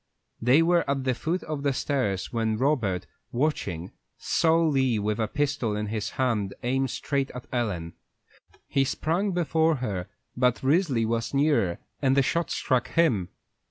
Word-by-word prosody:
They 130 +8 +5
were 170 0 +3
at 140 -1 0
the 130 -1 +1
foot 165 +9 -2
of 155 -2 -4
the 140 -1 +1
stairs, 115 -10 -1
when 110 -2 0
Robert, 115 -9 +1 0.3
watching, 100 - -1 0.3
saw 165 0 +2
Lee 135 -7 +2
with 105 +1 -1
a 110 - +1
pistol 140 -4 -1
in 105 0 -3
his 110 -1 -2
hand 110 -7 0
aim 135 +2 +1
straight 135 +2 -2
at 125 - -7
Ellen. 95 -9 -2 0.7
He 135 - +2
sprang 165 +8 0
before 165 -2 +2
her, 105 -8 -3 0.3
but 125 0 +1
Risley 140 -5 +2
was 115 +3 -1
nearer, 140 - +2 0.2
and 135 -1 +3
the 140 - +5
shot 170 +4 0
struck 130 -1 0
him. 120 - +2
130 Hz, 160 wpm, -26 LUFS, 110-150 Hz, 0.7 s, They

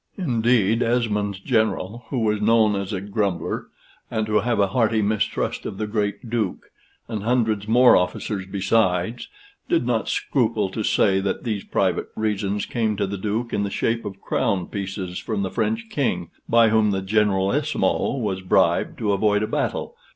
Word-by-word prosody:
Indeed, 120 - +2
Esmond's 105 -5 0
general, 110 0 -1
who 135 - -2
was 105 -2 +1
known 110 -1 +4
as 100 +1 -3
a 100 - -2
grumbler, 100 -3 -2 0.4
and 110 -1 -1
to 105 0 +2
have 120 0 0
a 100 -1 +3
hearty 110 0 +2
mistrust 110 +1 -1
of 95 - -6
the 110 - -2
great 105 +1 -2
Duke, 110 -5 -3 0.4
and 110 -3 -4
hundreds 110 -2 0
more 120 +3 +6
officers 95 +2 -1
besides, 95 +1 0 0.4
did 165 -7 +2
not 120 -2 0
scruple 110 -6 0
to 110 - -4
say 95 -2 +2
that 95 0 -2
these 105 -4 -2
private - - 0
reasons 105 -2 -1
came 110 -3 -1
to 100 - +1
the 100 +1 -4
Duke 110 +4 -3
in - - +1
the 100 - -1
shape 115 +3 -1
of 100 -1 -7
crown 100 -8 0
pieces 95 -2 -4
from 105 -3 -2
the 95 - -3
French 110 0 -1
King, 90 - -1 0.2
by 115 -1 +5
whom 110 -1 +3
the 95 -1 -1
Generalissimo 105 +9 +1
was 100 -6 -2
bribed 90 - +2
to 105 -2 0
avoid 105 +1 +2
a - - -1
battle. - - -2
105 Hz, 170 wpm, -23 LUFS, 100-115 Hz, 0.4 s, more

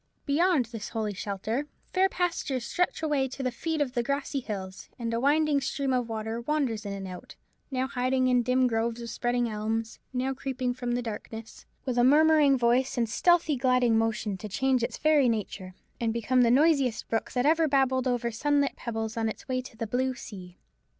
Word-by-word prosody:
Beyond 310 -1 +3
this 225 -2 -7
holy 215 -2 -2
shelter 210 +8 -3 0.3
fair 380 +1 +4
pastures 335 -9 -1
stretch 360 +1 -1
away 290 -4 +1
to 265 +1 -6
the 255 - 0
feet 320 +4 -2
of 260 -4 -1
the 240 - +1
grassy 280 +2 -2
hills: 195 -6 -6
and 230 -1 -3
a 230 - 0
winding 290 +2 +3
stream 270 0 -1
of 245 -2 0
water 220 +1 -3
wanders 240 -6 -1
in 200 - -3
and 195 -1 -6
out: 180 -1 -9 0.3
now 260 -2 -1
hiding 255 0 +1
in 250 -1 +4
dim 255 +2 +2
groves 230 0 0
of 235 -1 -6
spreading 240 0 0
elms: 220 +1 -3
now 260 +1 -1
creeping 255 -2 -2
from 245 -1 -3
the 245 0 -1
darkness, 225 0 -8 0.2
with 250 -2 0
a - - +5
murmuring 295 0 +5
voice 250 +2 +2
and 230 -2 +1
stealthy 335 +4 +3
gliding 250 -2 +3
motion, 220 -3 0
to 215 - -7
change 265 +4 +1
its 235 - -2
very 300 -5 +4
nature, 195 -4 -4 0.2
and 230 -2 0
become 250 +2 +2
the 235 - +4
noisiest 275 -2 +3
brook 225 - -2
that 250 0 +1
ever 320 +1 +4
babbled 265 -2 +2
over 240 -1 0
sunlit 285 +4 +1
pebbles 225 -2 -4
on 225 -1 0
its 220 - -8
way 255 -1 -1
to 245 -3 -13
the 225 - -2
blue 255 +4 -1
sea. 185 -6 -10
250 Hz, 195 wpm, -28 LUFS, 225-275 Hz, 0.3 s, a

